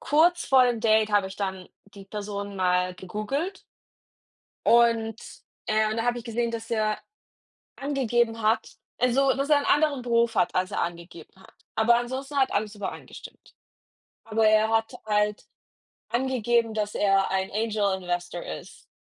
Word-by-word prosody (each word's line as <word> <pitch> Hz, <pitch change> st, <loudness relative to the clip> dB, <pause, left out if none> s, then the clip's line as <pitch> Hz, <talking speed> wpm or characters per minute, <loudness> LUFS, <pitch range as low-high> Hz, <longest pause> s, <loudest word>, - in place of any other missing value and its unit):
kurz 340 Hz, +4 st, +3 dB
vor 260 Hz, -1 st, +6 dB
dem 240 Hz, -2 st, 0 dB
Date 220 Hz, -1 st, +3 dB
habe 205 Hz, -2 st, +3 dB
ich 190 Hz, -, -10 dB
dann 190 Hz, -2 st, -4 dB, 0.3 s
die 200 Hz, -1 st, -11 dB
Person 200 Hz, -1 st, -5 dB
mal 180 Hz, 0 st, +1 dB
gegoogelt. 215 Hz, -, -4 dB, 1.0 s
Und 230 Hz, -2 st, +4 dB, 0.5 s
äh, 215 Hz, 0 st, +2 dB
und 215 Hz, -, -3 dB
da 230 Hz, -, 0 dB
habe 245 Hz, 0 st, 0 dB
ich -, -, -11 dB
gesehen, 235 Hz, 0 st, -2 dB
dass 225 Hz, -1 st, -6 dB
er 215 Hz, -2 st, 0 dB, 0.8 s
angegeben 240 Hz, -5 st, 0 dB
hat 220 Hz, +1 st, +1 dB, 0.3 s
also, 260 Hz, +2 st, +3 dB
dass 275 Hz, +2 st, -2 dB
er 300 Hz, -, +6 dB
'n 285 Hz, -, -4 dB
anderen 295 Hz, -3 st, +2 dB
Beruf 235 Hz, -1 st, +2 dB
hat, 230 Hz, -, +1 dB
als 185 Hz, +2 st, 0 dB
er -, -, -2 dB
angegeben 170 Hz, -1 st, -6 dB
hat. 190 Hz, 0 st, -18 dB, 0.2 s
Aber 230 Hz, +2 st, +4 dB
ansonsten 265 Hz, +4 st, -4 dB
hat 265 Hz, -1 st, +2 dB
alles 210 Hz, +1 st, -1 dB
übereingestimmt. 205 Hz, -2 st, -9 dB, 0.7 s
Aber 220 Hz, 0 st, +2 dB
er 215 Hz, 0 st, +4 dB
hat 225 Hz, 0 st, 0 dB
halt 210 Hz, -1 st, 0 dB, 0.6 s
angegeben, 240 Hz, -2 st, +1 dB
dass 210 Hz, -1 st, -2 dB
er 195 Hz, -1 st, +2 dB
ein 190 Hz, 0 st, -1 dB
Angel 210 Hz, -2 st, 0 dB
Investor 175 Hz, -1 st, -3 dB
ist. 80 Hz, -, -9 dB
220 Hz, 155 wpm, -26 LUFS, 200-240 Hz, 1.0 s, vor